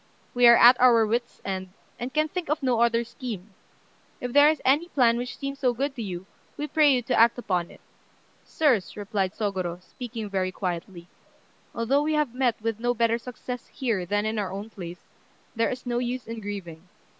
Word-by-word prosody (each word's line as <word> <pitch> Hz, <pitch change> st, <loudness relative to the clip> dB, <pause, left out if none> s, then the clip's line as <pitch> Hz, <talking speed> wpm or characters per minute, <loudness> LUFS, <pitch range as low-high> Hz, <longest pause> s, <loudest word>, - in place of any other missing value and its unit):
We 245 Hz, -1 st, +6 dB
are 235 Hz, -, +9 dB
at 245 Hz, +1 st, +7 dB
our 235 Hz, -3 st, +6 dB
wits' 235 Hz, +3 st, -2 dB
end, 190 Hz, -1 st, -3 dB, 0.3 s
and 245 Hz, +2 st, -4 dB
can 305 Hz, +2 st, +1 dB
think 355 Hz, +1 st, -5 dB
of 300 Hz, 0 st, -1 dB
no 245 Hz, -3 st, +2 dB
other 235 Hz, 0 st, +3 dB
scheme. 215 Hz, -5 st, -8 dB, 0.7 s
If 245 Hz, -1 st, -5 dB
there 290 Hz, +1 st, +7 dB
is 310 Hz, -2 st, 0 dB
any 290 Hz, +6 st, +3 dB
plan 245 Hz, -8 st, +3 dB
which 245 Hz, +1 st, -4 dB
seems 275 Hz, 0 st, -5 dB
good 265 Hz, +1 st, 0 dB
to 240 Hz, -, -5 dB
you, 185 Hz, -3 st, -5 dB, 0.3 s
we 295 Hz, -, -2 dB
pray 300 Hz, -1 st, +4 dB
you 250 Hz, -2 st, +2 dB
to 245 Hz, -, -2 dB
act 230 Hz, +1 st, +5 dB
upon 180 Hz, -7 st, -1 dB
it." -, -, -16 dB, 0.6 s
"Sirs," 240 Hz, -, +1 dB
replied 200 Hz, -2 st, -2 dB
Sôgorô, 185 Hz, -5 st, -2 dB
speaking 230 Hz, 0 st, -7 dB
very 190 Hz, -2 st, -1 dB
quietly, 175 Hz, -1 st, -5 dB, 0.7 s
"although 250 Hz, +5 st, +2 dB
we 310 Hz, +1 st, 0 dB
have 300 Hz, -6 st, 0 dB
met 250 Hz, -3 st, 0 dB
with 225 Hz, -1 st, -2 dB
no 245 Hz, +1 st, 0 dB
better 230 Hz, 0 st, +2 dB
success 250 Hz, 0 st, -7 dB
here 230 Hz, -8 st, -2 dB
than 205 Hz, +2 st, 0 dB
in 220 Hz, 0 st, -1 dB
our 195 Hz, -3 st, -2 dB
own 200 Hz, +3 st, -6 dB
place, 175 Hz, -4 st, -9 dB, 0.5 s
there 230 Hz, 0 st, +1 dB
is 255 Hz, 0 st, -6 dB
no 240 Hz, -1 st, -1 dB
use 245 Hz, -1 st, -3 dB
in 230 Hz, 0 st, -6 dB
grieving. 185 Hz, -5 st, -7 dB
235 Hz, 195 wpm, -26 LUFS, 200-255 Hz, 0.7 s, are